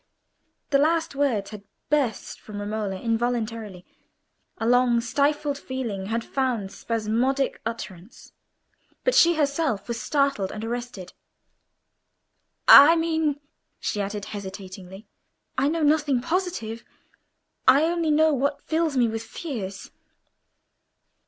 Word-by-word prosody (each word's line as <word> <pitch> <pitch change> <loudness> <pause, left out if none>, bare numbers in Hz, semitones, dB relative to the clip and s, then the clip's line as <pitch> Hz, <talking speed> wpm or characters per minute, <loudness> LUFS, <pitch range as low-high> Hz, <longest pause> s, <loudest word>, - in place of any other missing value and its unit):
The 275 - +4
last 325 +2 +1
words 250 -9 0
had 210 -2 -8 0.3
burst 275 -8 -1
from 210 -1 -8
Romola 205 -2 -3
involuntarily: 225 -4 -2 0.7
a 225 - -3
long 245 0 +4
stifled 285 +4 0
feeling 230 -9 -4
had 230 +2 -2
found 245 -8 -2
spasmodic 235 +5 -1
utterance. 210 -3 -8 0.7
But - - +2
she 340 -5 +5
herself 280 -8 0
was 235 -1 -4
startled 275 -10 0
and 215 +1 -6
arrested. 235 -6 -6 1.5
"I 295 +4 +10
mean," 320 -3 0 0.4
she 205 - -2
added, 200 0 -4
hesitatingly, 190 0 -9 0.5
"I 270 +2 +2
know 320 +1 0
nothing 295 -3 +3
positive. 320 -8 -3 0.8
I 275 +3 +7
only 335 -1 0
know 310 +1 +4
what 280 +1 -1
fills 320 -3 0
me 240 -2 +4
with 225 0 -3
fears." 225 - -6
245 Hz, 115 wpm, -25 LUFS, 215-290 Hz, 1.5 s, I